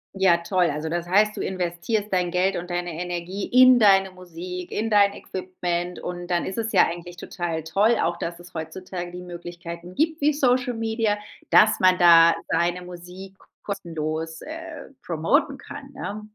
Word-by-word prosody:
Ja, 190 -3 +4
toll. 180 0 +2
Also 150 +2 -3
das 175 +1 -3
heißt, 210 +3 +3
du - - -4
investierst 190 +4 -2
dein 180 -1 +1
Geld 185 +2 +1
und 175 +1 -5
deine 175 0 -2
Energie 180 +2 -4
in 255 0 +7
deine 195 -3 +5
Musik, 180 0 -8
in 225 +1 -2
dein 200 -1 +5
Equipment. 180 -2 -4
Und 175 0 -6
dann 175 -1 0
ist 190 - -4
es 225 0 -2
ja 190 - +5
eigentlich 175 +1 -7
total 170 -3 -4
toll, 205 +8 +2
auch 170 +1 0
dass 170 0 -5
es 175 0 -14
heutzutage 175 +2 -6
die 180 0 -8
Möglichkeiten 175 0 -9
gibt 315 +1 0
wie 295 +1 +4
Social 255 -3 +1
Media, 225 -1 0 0.3
dass 215 0 +5
man 185 -1 +5
da 170 -1 +7
seine 175 +1 0
Musik 180 +2 -11 0.3
kostenlos, 160 -4 -4
äh, 325 0 -8
promoten 275 - +1
kann, 280 -1 -10
ja. 205 -3 -5
180 Hz, 170 wpm, -24 LUFS, 175-210 Hz, 0.3 s, in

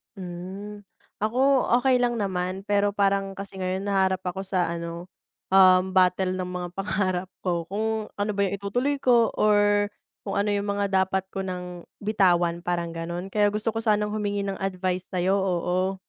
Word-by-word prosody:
Hmm, 190 +3 -8 0.4
ako 260 +4 +2
okey 260 0 +3
lang 240 -1 +1
naman, 190 0 -2
pero 205 0 +2
parang 195 -1 +1
kasi 195 0 -8
ngayon 190 +1 -3
nahaharap 190 -2 +2
ako 190 +2 -3
sa 185 -2 0
ano, 170 +1 -5 0.4
um, 185 0 +5
battle 185 0 +3
ng 185 -1 -3
mga 180 -1 -4
pangarap 190 -2 -1
ko, 175 -2 -1
kung 220 +1 -2
ano 205 +1 0
ba 200 - +2
'yung 195 0 0
itutuloy 245 +8 -1
ko 240 -3 +4
or 205 -1 +4 0.4
kung - - -2
ano 205 +1 +1
yung 200 0 -1
mga 200 - +1
dapat 190 0 +1
ko - - -3
nang 180 -2 -6 0.2
bitawan, 175 -5 +2
parang 170 -1 -2
ganu'n 170 +2 -4
kaya 210 0 +3
gusto 210 +2 -1
ko 225 - -2
sanang 210 -2 +1
humingi 205 -1 -1
ng 195 -1 -4
advice 185 -1 -2
sayo, 185 0 +1
oo. 185 0 0
195 Hz, 170 wpm, -25 LUFS, 180-205 Hz, 0.4 s, um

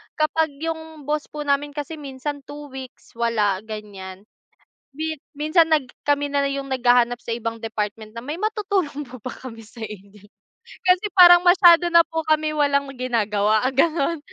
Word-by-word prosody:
kapag 315 +1 +1 0.2
yung 320 -2 -5
boss 300 +1 -2
po 300 0 -6
namin 285 0 -1
kasi 295 +2 -5
minsan 285 +1 -6
2 290 -1 -10
weeks 265 -1 -11
wala 220 -5 0
ganiyan. 205 -3 -9 0.7
Mi 315 +3 -4 0.2
minsan 320 +2 +3
nag 305 -4 +2 0.2
kami 290 0 0
na 280 - +2
'yung 275 0 -4
naghahanap 245 -2 +2
sa - - -11
ibang 230 -1 -4
department 215 -1 -4
na, 230 +3 -10
"May 315 +7 -5
matutulong 390 -9 -2
po 250 -2 -12
ba 255 - -6
kami 230 -3 -10
sa 220 +1 -9
inyo?" 205 0 -12 0.6
Kasi 365 +2 +3
parang 350 -1 +9
masyado 350 -1 +6
na 340 -1 +6
po 325 0 -4
kami 310 0 +2
walang 280 -2 +1
ginagawa 215 -3 +1
ganon 315 +3 +1
280 Hz, 160 wpm, -22 LUFS, 230-315 Hz, 0.7 s, parang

